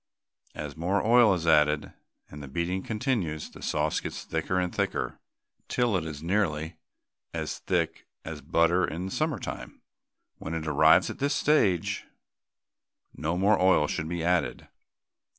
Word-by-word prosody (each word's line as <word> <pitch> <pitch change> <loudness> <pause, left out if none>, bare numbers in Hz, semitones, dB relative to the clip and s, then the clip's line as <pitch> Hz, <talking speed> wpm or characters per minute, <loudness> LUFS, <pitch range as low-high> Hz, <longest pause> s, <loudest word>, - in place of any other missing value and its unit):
As 75 -1 -6
more 90 +6 0
oil 120 -1 +6
is 85 -2 -4
added, 75 -2 +3 0.3
and 75 - -10
the 70 - -8
beating 85 +7 -2
continues, 105 - -2
the - - -13
sauce - - 0
gets - - -6
thicker 80 +3 -2
and 90 -1 -1
thicker, - - -2 0.5
till 120 -4 +1
it 85 -3 -1
is 75 -1 -7
nearly 85 -4 -1 0.6
as - - -3
thick - - -1 0.2
as - - -6
butter 85 +2 +2
in 90 +4 -3
summer 155 +1 0
time. - - -7 0.6
When 80 - -5
it 80 -1 -3
arrives 75 - +5
at - - -10
this 145 +1 +1
stage 100 - +2 1.1
no 80 +3 -2
more 100 +2 +3
oil 95 -5 +5
should 80 +1 -3
be 85 -1 -3
added. 90 +1 0
85 Hz, 150 wpm, -28 LUFS, 80-100 Hz, 1.1 s, oil